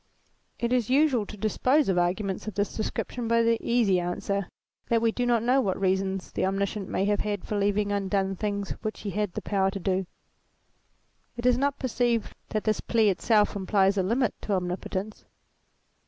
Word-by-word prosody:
It 235 +1 -1
is 245 -3 +1
usual 260 -6 +3
to 210 - -9
dispose 255 +8 +2
of 190 - +2
arguments 190 +3 -1
of 215 - -5
this 205 0 -1
description 230 +2 -3
by 230 0 +3
the 230 0 +2
easy 225 -6 +2
answer, 180 +2 -2 0.4
that 230 - +3
we 225 0 +2
do 245 +2 -1
not 235 -2 +2
know 255 +3 +3
what 190 -6 -1
wise 195 - -6
reasons 190 0 0
the - - -2
Omniscient 195 +1 -1
may 195 - 0
have 205 0 +1
had 205 -3 -2
for 210 - -3
leaving 205 0 +1
undone 195 -1 0
things 200 0 -3
which 215 -1 -4
he 205 - -4
had 205 -3 -2
the - - -5
power 195 -2 +1
to 195 0 -5
do. 190 0 -1 1.3
It 240 - -5
is 250 -1 +5
not 280 0 +1
perceived 240 -3 0 0.2
that 215 - -2
this 215 -1 +1
plea 225 -3 +3
itself 210 +3 +2
implies 195 0 +2
a 195 - +2
limit 230 +5 +1
to 205 - -2
Omnipotence. 185 +3 -3
205 Hz, 190 wpm, -27 LUFS, 195-230 Hz, 1.3 s, is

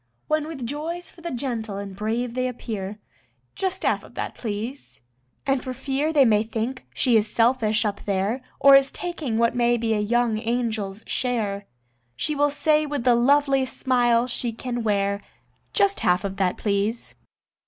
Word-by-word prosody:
When 310 0 0
with 285 -7 -6
joys 320 +7 -4
for 340 - -17
the 340 - -4
gentle 235 -6 -3
and 200 -1 -6
brave 230 +4 -2
they 255 0 0
appear: 210 -5 -5 0.6
"Just 380 -1 -1
half - - +1
of - - -16
that, - - -3
please." 230 +5 -5 0.5
And 270 -2 +1
for 255 -1 -5
fear 275 +4 -1
they 285 -4 +5
may 210 -3 +4
think 225 +3 -3
she 245 -4 +3
is 215 0 0
selfish 230 -2 +2
up 205 -1 -3
there, 200 +5 0 0.2
Or 275 0 +8
is 275 0 +5
taking 315 -10 -3
what 230 +1 +2
may 240 0 +3
be 225 -1 0
a 210 - +1
young 225 +1 +1
angel's 225 -3 -2
share, 210 -6 -2 0.5
She 300 - -1
will 290 0 +2
say 305 +1 +2
with 285 -4 -3
the 250 -1 +5
loveliest 270 +1 +2
smile 245 -2 +3
she 240 -1 -2
can 240 +1 -4
wear: 200 -2 0 0.5
"Just 400 -1 +3
half 180 0 +2
of 195 -1 -4
that, 185 -2 +1
please." 205 +3 -1
240 Hz, 175 wpm, -24 LUFS, 215-270 Hz, 0.6 s, Or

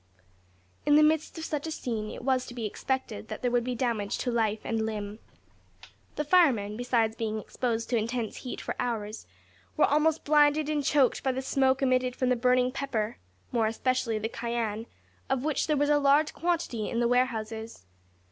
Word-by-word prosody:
In 295 - +4
the 305 - +7
midst 310 +2 +1
of 320 - -4
such 300 0 -3
a - - -4
scene 225 -8 -3
it - - -8
was 260 -1 +1
to 245 - -9
be 235 -3 -3
expected 230 0 -3
that - - -7
there 245 - +1
would 240 -1 +2
be 250 0 -2
damage 230 -5 -1
to 245 - -2
life 220 -2 0
and 225 -1 -1
limb. 210 -1 -4 1.0
The 300 - -1
firemen, 275 - +3
besides 230 -2 +1
being 220 -1 -2
exposed 230 +1 -2
to 240 - +3
intense 230 0 -2
heat 250 - -6
for - - -3
hours, 220 -3 -3 0.5
were 300 - +6
almost 305 +2 +2
blinded 295 0 +4
and 295 -1 0
choked 275 -2 +3
by 265 - +1
the 260 +1 -3
smoke 265 0 +2
emitted 255 -1 +2
from 255 - 0
the 250 - +3
burning 250 +1 +2
pepper 245 -6 -3 0.3
more 225 -2 +2
especially 230 0 0
the 215 +1 -2
cayenne 230 -1 -3 0.4
of 265 -1 0
which 305 -1 0
there 305 -2 +2
was 290 +1 +2
a 295 - +4
large 290 +2 +3
quantity 325 -11 -1
in 235 - -1
the 240 - +3
warehouses. 225 - -1
250 Hz, 190 wpm, -28 LUFS, 225-275 Hz, 1.0 s, the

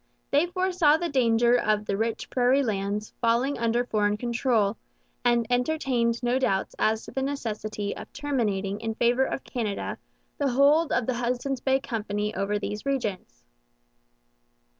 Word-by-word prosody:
They 290 +5 +3
foresaw 355 -4 +3
the 340 +1 -2
danger 240 -3 +3
of 215 -1 +1
the 200 - -1
rich 225 +2 -2
prairie 255 +2 +3
lands 205 -1 -2
falling 240 +4 +1
under 235 +1 +1
foreign 210 -2 +1
control, 235 -3 +1 0.5
and 240 -1 +3
entertained 245 -2 0
no 245 +2 +2
doubts 195 -7 0
as 220 0 +1
to - - -9
the 265 - -2
necessity 215 -7 -3
of - - -10
terminating 210 -9 -1
in 225 -1 -3
favour 240 +3 +3
of 270 - -4
Canada 215 -5 -3 0.4
the 285 -2 +2
hold 285 +5 +4
of 240 -1 +1
the 255 - 0
Hudson's 245 +2 -2
Bay 265 0 +2
Company 210 -4 -3
over 205 +1 -1
these 210 0 -4
regions. 205 - -3
240 Hz, 150 wpm, -26 LUFS, 210-270 Hz, 0.5 s, hold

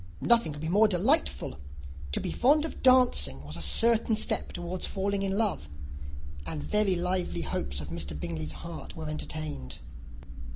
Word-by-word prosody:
Nothing 235 -9 +4
could 145 0 -8
be 160 - -3
more 205 +6 +5
delightful! 170 - +1 0.5
To - - +2
be - - -3
fond 295 +5 +3
of 320 - -7
dancing 245 - +4
was 75 +1 -7
a 85 - -6
certain 225 - +3
step - - +1
towards 175 +1 -4
falling 200 0 -1
in 195 0 -1
love; 205 - -1 0.7
and 75 -1 -5
very 195 - +2
lively 180 - -1
hopes 70 -3 -3
of 75 - -7
Mr. 80 -3 -5
Bingley's 80 -1 -4
heart 170 -1 -8
were 160 -1 -6
entertained. 150 - -5
165 Hz, 160 wpm, -29 LUFS, -, 0.7 s, more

